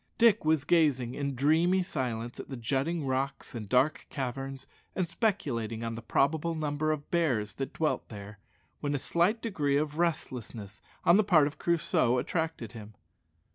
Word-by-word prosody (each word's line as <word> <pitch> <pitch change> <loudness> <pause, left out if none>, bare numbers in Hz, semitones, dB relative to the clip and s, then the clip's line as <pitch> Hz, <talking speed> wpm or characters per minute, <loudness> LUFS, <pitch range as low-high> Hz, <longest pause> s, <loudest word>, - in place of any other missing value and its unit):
Dick 230 -2 +5
was 155 -2 +2
gazing 145 -8 +2
in 140 -1 -3
dreamy 165 +7 +3
silence 120 -7 -3
at - - -8
the 135 - -5
jutting 140 +7 -1
rocks 135 +2 -2
and 110 -4 -6
dark 140 +7 +2
caverns, 135 0 -4 0.3
and 185 -2 0
speculating 135 - -1
on 115 0 -3
the 115 - -6
probable 155 +7 +1
number 155 0 -1
of 150 -1 -4
bears 130 -12 +1
that 135 - -5
dwelt 160 - -1
there, 100 -1 -9 0.4
when 145 -1 -1
a - - +1
slight 175 - +1
degree 150 -11 +1
of 150 +1 -2
restlessness 120 - -3 0.2
on 170 - +6
the 215 - +5
part 170 -7 +5
of 145 - -5
Crusoe 155 -7 +2
attracted 160 - -2
him. 110 -2 -10
145 Hz, 165 wpm, -30 LUFS, 125-165 Hz, 0.4 s, on